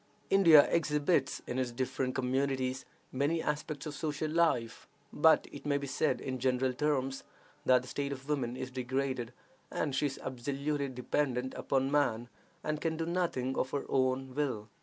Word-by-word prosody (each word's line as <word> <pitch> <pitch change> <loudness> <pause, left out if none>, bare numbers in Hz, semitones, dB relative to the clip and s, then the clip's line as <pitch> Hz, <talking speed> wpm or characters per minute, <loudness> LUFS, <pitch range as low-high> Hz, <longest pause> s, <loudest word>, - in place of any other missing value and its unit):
India 165 -7 +8
exhibits, 150 -2 +1
in 125 - -3
its 125 -2 -1
different 130 +1 -2
communities, 130 0 0 0.3
many 145 +5 +1
aspects 150 -1 -3
of 150 - -4
social 150 +1 -2
life, 155 -9 +1 0.3
but 160 +1 +5
it 145 - -9
may 145 -1 +1
be 140 - -4
said, 145 +3 0
in 130 -1 -4
general 130 0 +1
terms, 135 -1 -1 0.4
that 125 -1 +5
the - - -11
state 140 +2 -3
of 135 0 -7
woman 130 -5 -1
is 130 0 -5
degraded, 130 -1 -2 0.4
as 145 -3 -2
she 145 +2 +2
is 140 - -6
absolutely 140 +3 -2
dependent 130 0 -1
upon 135 0 0
man, 120 -5 +1 0.3
and 155 0 -2
can 160 -1 -1
do 165 - -1
nothing 165 -7 -1
of 130 - 0
her 140 - -3
own 130 0 +1
will. 125 -7 -2
135 Hz, 165 wpm, -32 LUFS, 130-150 Hz, 0.4 s, India